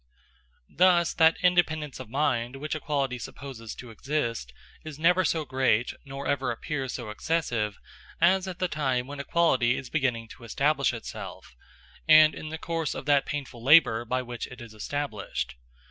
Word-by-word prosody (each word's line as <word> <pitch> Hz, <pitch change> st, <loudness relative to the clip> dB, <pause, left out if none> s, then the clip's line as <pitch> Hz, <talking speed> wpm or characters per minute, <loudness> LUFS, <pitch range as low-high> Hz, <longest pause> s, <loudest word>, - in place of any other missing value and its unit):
Thus, 175 Hz, -2 st, +4 dB
that 160 Hz, 0 st, +5 dB
independence 160 Hz, -5 st, +2 dB
of -, -, -8 dB
mind 125 Hz, -2 st, 0 dB
which 150 Hz, +3 st, -4 dB
equality 140 Hz, -5 st, -2 dB
supposes 120 Hz, -3 st, -8 dB
to 125 Hz, -2 st, -10 dB
exist, 115 Hz, -, -3 dB, 0.3 s
is 155 Hz, -2 st, -8 dB
never 180 Hz, +4 st, +4 dB
so 160 Hz, -3 st, 0 dB
great, 130 Hz, -3 st, +1 dB
nor 135 Hz, +1 st, -7 dB
ever 135 Hz, -2 st, 0 dB
appears 135 Hz, +2 st, -3 dB
so 120 Hz, -4 st, -5 dB
excessive, 115 Hz, -6 st, -1 dB, 0.4 s
as 190 Hz, +2 st, +4 dB
at 185 Hz, -2 st, -5 dB
the 185 Hz, -, 0 dB
time 130 Hz, -6 st, -1 dB
when 140 Hz, +1 st, -8 dB
equality 135 Hz, -5 st, +2 dB
is 130 Hz, -, -7 dB
beginning 125 Hz, -7 st, 0 dB
to -, -, -13 dB
establish 140 Hz, +5 st, +1 dB
itself, 115 Hz, -, -8 dB, 0.5 s
and 155 Hz, 0 st, +8 dB
in 155 Hz, -, -7 dB
the 160 Hz, -, -5 dB
course 165 Hz, -2 st, -3 dB
of -, -, -6 dB
that 145 Hz, -1 st, +3 dB
painful 140 Hz, -5 st, -5 dB
labor 130 Hz, -5 st, +6 dB
by 125 Hz, +2 st, -1 dB
which 120 Hz, -1 st, -6 dB
it 125 Hz, -, -12 dB
is 120 Hz, -3 st, -10 dB
established. 110 Hz, -, -4 dB
135 Hz, 160 wpm, -27 LUFS, 120-155 Hz, 0.5 s, and